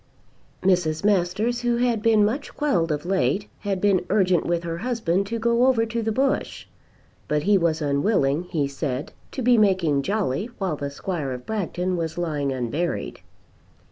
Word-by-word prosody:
Mrs. 175 -4 +2
Masters, 205 +4 +1
who 240 -1 +1
had 240 -3 +1
been 220 -2 +4
much 265 +7 -3
quelled 175 - +1
of 150 +2 -2
late, 195 +2 0
had 200 -3 -2
been 195 -2 +2
urgent 185 -4 +2
with 170 0 0
her 165 0 -4
husband 200 -5 0
to 230 +3 -2
go 235 +2 +3
over 235 -4 +3
to 230 +1 -3
the 225 0 -1
Bush; 270 +4 -1 0.6
but 150 0 0
he 205 +1 +4
was 165 -4 +1
unwilling, 145 +1 +1
he 155 -6 -1
said, 140 -1 -4 0.2
to 260 - -4
be 245 -1 +5
making 185 -9 +3
jolly 200 - -1
while 190 -6 -1
the 140 -1 -4
Squire 145 -2 -4
of 125 0 -8
Bragton 185 -3 -2
was 165 0 -3
lying 150 -5 -1
unburied. 135 +7 -3
185 Hz, 170 wpm, -24 LUFS, 155-220 Hz, 0.6 s, be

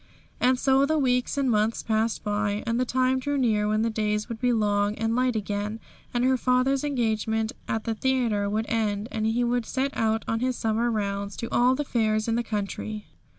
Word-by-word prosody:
And 255 +1 +3
so 265 +1 +3
the 315 +1 +1
weeks 250 -1 +1
and 270 -3 +2
months 215 +1 +1
passed 220 0 0
by, 205 0 -1
and 230 0 0
the 255 - +2
time 255 +1 +1
drew 285 +2 -1
near 215 -5 +2
when 215 +1 +1
the 230 - 0
days 210 0 -1
would 230 0 -6
be 250 -1 +3
long 205 -2 +1
and 225 +1 -1
light 250 -1 +1
again, 210 +1 -3 0.3
and 240 0 0
her 260 0 +3
father's 255 +2 +2
engagement 220 -5 0 0.2
at 220 0 -2
the 225 - -1
theatre 225 -4 0
would 215 +2 -1
end, 215 -1 -1
and 220 0 -1
he 235 +2 +1
would 240 -1 0
set 275 +1 -1
out 225 0 0
on 225 - 0
his 255 0 -1
summer 225 +2 0
rounds 200 -2 -2
to 230 - -4
all 250 +2 +4
the 295 +2 -2
fairs 215 -3 0
in 225 - +1
the 235 - +1
country. 215 -1 -4
225 Hz, 210 wpm, -26 LUFS, 215-250 Hz, 0.3 s, all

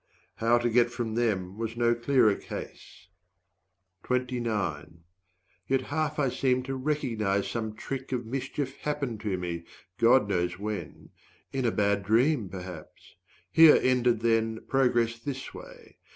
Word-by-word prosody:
How 115 +2 +3
to 120 0 0
get 120 0 +3
from 120 -2 -4
them 105 -4 -1
was 115 0 -4
no 120 0 +3
clearer 120 -2 +3
case. 85 - -9 1.0
Yet 125 0 0 1.4
half 145 +3 -1
I 140 -3 +2
seemed 125 0 0
to 135 0 -3
recognize 115 -9 -1
some 110 +1 -4
trick 135 +4 -6
Of 125 -2 -2
mischief 135 +2 -4
happened 140 -7 -3
to 105 -3 -2
me, 85 -2 -4 0.4
God 115 -1 +5
knows 90 -3 -1
when 105 +1 -6 0.4
170 135 - -3
In 130 - 0
a 115 - +3
bad 100 -1 +1
dream 115 +2 +2
perhaps. 90 -3 -10 0.4
Here 160 -2 +8
ended, 125 -3 +2
then, 115 -1 +1
Progress 120 -3 +1
this 135 +2 -6
way. - - -13
120 Hz, 135 wpm, -28 LUFS, 105-130 Hz, 1.4 s, Here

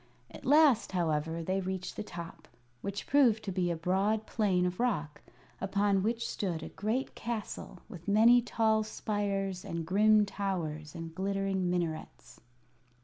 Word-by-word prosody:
At - - -11
last, 285 -8 +5
however, 160 -1 0
they 190 +3 0
reached 185 0 -4
the - - -4
top, 170 -4 -8 0.3
which 200 0 -4
proved 245 -6 +4
to 195 - -3
be 180 -1 0
a 170 - 0
broad 195 +6 0
plain 190 -5 +1
of 180 0 -2
rock, 180 -12 -1 0.4
upon 200 0 +2
which 230 +3 -1
stood 170 -5 -3
a - - -6
great 220 +7 -2
castle 220 -5 -5
with 180 -6 -11
many 230 +4 +6
tall 220 -2 +2
spires 200 -3 -2
and 170 -1 -4
grim 210 +4 +4
towers 165 -7 -4
and 165 -1 -7
glittering 195 0 -1
minarets. 160 -7 -4
195 Hz, 145 wpm, -31 LUFS, 175-215 Hz, 0.4 s, many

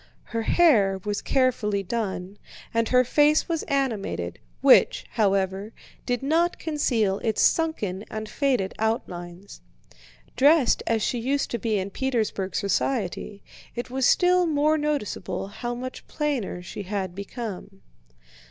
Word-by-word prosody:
Her 230 -1 -3
hair 220 - +4
was 205 -1 -2
carefully 230 -7 +1
done 195 -2 -4 0.3
and 230 0 +1
her 250 0 +5
face 295 +4 +3
was 330 -2 -1
animated, 220 - -2 0.2
which, - - +5
however, 195 -1 0 0.3
did 245 +1 -1
not 335 +5 +2
conceal 235 -11 0
its 220 -2 0
sunken 210 - +1
and 215 0 -5
faded 250 -8 0
outlines. 185 -4 -4 0.7
Dressed 285 -1 +4
as 225 -2 +1
she 245 - 0
used 275 +4 -1
to 235 - -2
be 220 -1 0
in 195 +1 -3
Petersburg 220 -7 -2
society, 200 -1 -1 0.3
it 240 0 -5
was 260 -1 +2
still 360 0 +4
more 305 0 +2
noticeable 290 - -2
how 240 +3 -4
much 255 +1 -7
plainer 265 - -2
she 190 - -7
had 190 -2 -3
become. 200 -1 -7
230 Hz, 130 wpm, -25 LUFS, 195-275 Hz, 0.7 s, her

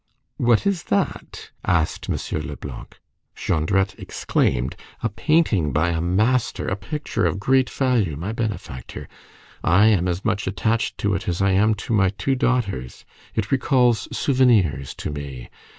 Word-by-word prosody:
"What 120 -2 +3
is 200 -4 0
that?" 100 - -2
asked 80 -3 0
M. - - 0 0.3
Leblanc. 75 - -9 0.4
Jondrette 95 +4 0
exclaimed:— 65 +1 0 0.3
"A 115 - +1
painting 110 - +2
by 80 +6 +2
a 80 -1 -1
master, 110 +8 +1
a 95 - 0
picture 130 0 -2
of 95 - -2
great 130 +4 +3
value, 120 - +1
my 90 +7 -4
benefactor! 105 - -5 0.6
I 95 +5 +5
am 95 -4 +2
as 90 +1 -2
much 105 -3 0
attached 110 +5 0
to 100 -1 0
it 100 +3 -2
as 85 - -1
I 100 0 +3
am 105 +3 +3
to 110 +2 -4
my 95 -3 +4
two 105 +7 -1
daughters; 115 - -1 0.3
it 110 +1 -2
recalls 125 -4 +2
souvenirs 105 - +2
to - - -5
me! 70 -4 -7
100 Hz, 150 wpm, -22 LUFS, 85-120 Hz, 0.6 s, I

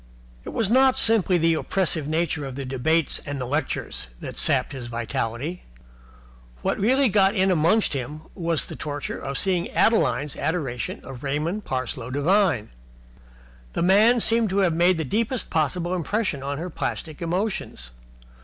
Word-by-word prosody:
It - - -5
was 220 -2 0
not 260 +1 +5
simply 210 -5 +4
the 165 0 +3
oppressive 160 -2 0
nature 160 -1 -1
of 135 -2 -6
the 140 0 -5
debates 140 +5 0
and 145 0 -5
lectures 130 - -3
that - - -7
sapped - - +2
his 130 -4 -6
vitality. 120 +6 -3 1.0
What - - 0
really 260 +7 +3
got 195 -2 +3
right 210 - -2
in 190 0 +4
amongst 175 +6 +2
him 140 +3 -4
was 170 -4 -1
the - - -8
torture 145 -2 -5
of 140 0 -4
seeing 180 -3 +1
Adeline's 145 - +2
adoration 140 -8 -3
of 130 -2 -9
Raymond 155 +9 -2
Parsloe 130 -2 -3
Devine. 145 - +2 1.0
The - - -1
man 215 +7 +5
seemed 230 -1 +2
to 190 - -1
have 170 - +1
made 175 +2 +3
the 160 - -2
deepest 230 - -2
possible 165 +3 0
impression 185 -3 -1
upon 140 +1 -3
her 175 +3 -5
plastic 155 0 -4
emotions. 175 - -3
165 Hz, 155 wpm, -24 LUFS, 140-195 Hz, 1.0 s, not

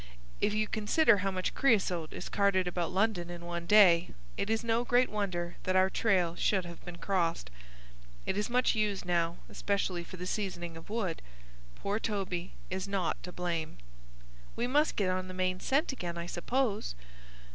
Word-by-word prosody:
"If 210 - +3
you 215 0 +1
consider 220 +4 +4
how 195 0 0
much 185 -1 -2
creasote 185 - +2
is - - -6
carted 195 -2 +2
about 175 -1 -1
London 190 -3 +1
in 175 0 -7
one 170 0 -4
day, 180 -5 +7 0.3
it 200 - -2
is 225 +1 +1
no 230 +1 +1
great 245 +1 +3
wonder 180 -5 -2
that 185 - -1
our 190 0 +4
trail 185 -7 +2
should 190 -1 +1
have 170 -1 -10
been 175 -1 -8
crossed. 170 - -1 0.7
It - - 0
is 210 +2 -1
much 250 +1 +3
used 210 -4 0
now, 170 -1 +1
especially 195 -3 -1
for 185 - -10
the 180 - -5
seasoning 180 -4 -3
of 165 +3 -11
wood. 210 -7 -2 0.5
Poor 205 +2 -2
Toby 190 -5 -3 0.2
is 190 +1 -2
not 195 -3 -1
to 180 - -7
blame." 170 - -3 0.8
"We 235 - 0
must 295 +5 +2
get 190 -3 +1
on 185 0 -2
the 185 - -7
main 185 0 0
scent 280 - +1
again, 175 -9 -5
I 170 - -4
suppose." 200 - -1
185 Hz, 180 wpm, -31 LUFS, 175-210 Hz, 0.8 s, day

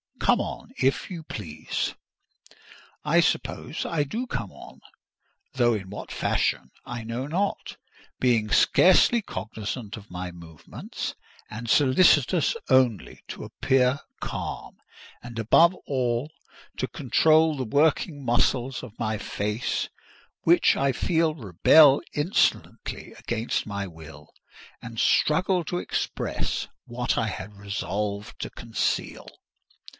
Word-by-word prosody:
Come - - +3
on, - - -6
if 135 +8 +1
you 170 -3 -6
please." 80 - -4 1.1
I - - +3
suppose - - -1
I 160 -3 0
do 225 - -4
come - - -4
on; - - -13 0.7
though 120 -2 +3
in 95 -3 -4
what 105 - -8
fashion 65 - 0
I 120 -2 -6
know 120 +4 -4
not; 190 +6 -2 0.4
being 115 -4 +2
scarcely 190 - +5
cognisant 110 - -6
of 105 -1 -13
my 90 0 -5
movements, 85 -3 -8 0.3
and 115 +2 -7
solicitous 145 +3 +4
only 130 -5 +2
to - - -7
appear 130 +1 +1 0.2
calm; - - -5 0.4
and, 120 -1 -9
above 165 - +5
all, 130 +1 -1 0.5
to - - -1
control 160 0 +3
the 130 -2 -3
working 145 +3 +1
muscles 125 +1 +1
of 115 -3 -11
my 110 -1 -1
face—which 110 - -1
I 135 0 +2
feel 160 +3 +1
rebel 135 - +5
insolently 150 +6 -1
against 115 -1 -2
my 100 -1 -3
will, 80 -4 -12 0.5
and 115 -1 -7
struggle 180 +3 +3
to 175 - -2
express - - -3 0.2
what 120 +1 -2
I 115 - +1
had 105 0 -6
resolved 100 +1 -4
to - - -4
conceal. 115 -3 -3
120 Hz, 115 wpm, -26 LUFS, 105-150 Hz, 1.1 s, scarcely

